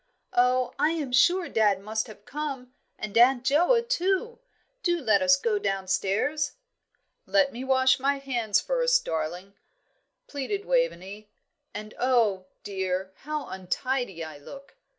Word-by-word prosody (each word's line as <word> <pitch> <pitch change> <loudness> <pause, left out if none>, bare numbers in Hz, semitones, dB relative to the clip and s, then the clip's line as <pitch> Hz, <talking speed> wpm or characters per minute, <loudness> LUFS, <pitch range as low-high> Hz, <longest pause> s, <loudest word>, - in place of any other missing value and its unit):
"Oh, 250 +1 +2
I 300 +3 +3
am 295 -6 -3
sure 345 +8 +4
dad 210 -3 +2
must 220 +4 -3
have 210 -2 -14
come, 265 -2 -5 0.2
and 215 0 -6
Aunt 245 +1 +5
Joa, 350 - +3
too. 465 +1 0 0.4
Do 345 -4 +1
let 220 -8 +2
us 275 0 +5
go 415 +9 0
downstairs." 200 - -1 0.7
"Let 290 -3 +3
me 245 +2 -6
wash 260 0 +3
my 280 +2 +1
hands 240 -7 0
first, - - +1
darling," 170 +5 -4 0.7
pleaded 390 +9 -4
Waveney. 215 - -1 0.4
"And 215 0 -8
oh, 225 -7 +2 0.2
dear, 190 -1 -3
how 300 0 -4
untidy 190 0 -3
I 155 -2 -9
look!" 275 - -12
255 Hz, 130 wpm, -26 LUFS, 205-300 Hz, 0.7 s, Aunt